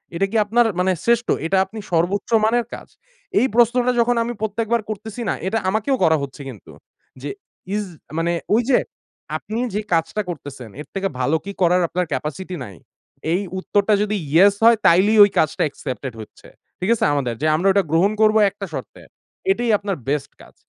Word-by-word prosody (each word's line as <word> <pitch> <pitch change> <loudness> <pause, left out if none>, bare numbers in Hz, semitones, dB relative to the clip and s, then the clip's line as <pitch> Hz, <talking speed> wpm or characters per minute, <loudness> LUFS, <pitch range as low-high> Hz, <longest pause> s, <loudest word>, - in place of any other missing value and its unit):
এটা 190 +4 +1
কি - - -5
আপনার 235 +3 +3
মানে 185 +1 +2
শ্রেষ্ঠ? 235 0 +2 0.2
এটা 190 +4 +1
আপনি 215 +3 -9
সর্বোচ্চ 175 +4 0 0.2
মানের 235 +2 +2
কাজ। - - -12 0.5
এই 255 - +3
প্রশ্নটা 240 +1 +4
যখন 240 +1 +3
আমি 240 +1 -3
প্রত্যেকবার 225 +2 0
করতেছি 215 +2 -6
না - - +1
এটা 220 +4 0
আমাকেও 220 +7 +1
করা 160 0 +4
হচ্ছে 140 +1 -8
কিন্তু। 115 -7 -12 0.5
যে 145 - -5 0.5
ইজ 210 - -1 0.3
মানে 165 +1 +1 0.2
ওই 225 - +4
যে 255 - +5 0.6
আপনি 220 +2 -5
যে 210 - -1
কাজটা 165 +5 0
করতেছেন, 140 -7 -7
এর - - -11
থেকে 195 0 0
ভালো 130 +5 +1
কি 200 - -4
করার 180 +1 +4
আপনার 180 +2 -1
capacity 155 +7 -4
নাই? 100 - -11 0.6
এই 180 - +1 0.2
উত্তরটা 205 +2 +1
যদি 210 0 0 0.2
"ইয়েস" 195 +6 +6
হয় 230 0 +7
তাইলেই 195 +6 +5
ওই 205 - +5
কাজটা 155 - +1
accepted 130 -2 -6
হচ্ছে। 110 - -14 0.3
ঠিক 185 - -2
আছে - - 0
আমাদের। 130 -5 -1
যে - - 0
আমরা 175 +5 +1
ওটা 200 0 +3
গ্রহণ 175 +5 +3
করব 215 0 +5
একটা 200 0 -7
শর্তে। - - -7 0.5
এটাই 240 -11 0
আপনার 200 -1 -3
বেস্ট 140 0 -1
কাজ। - - -17
195 Hz, 185 wpm, -21 LUFS, 165-220 Hz, 0.6 s, হয়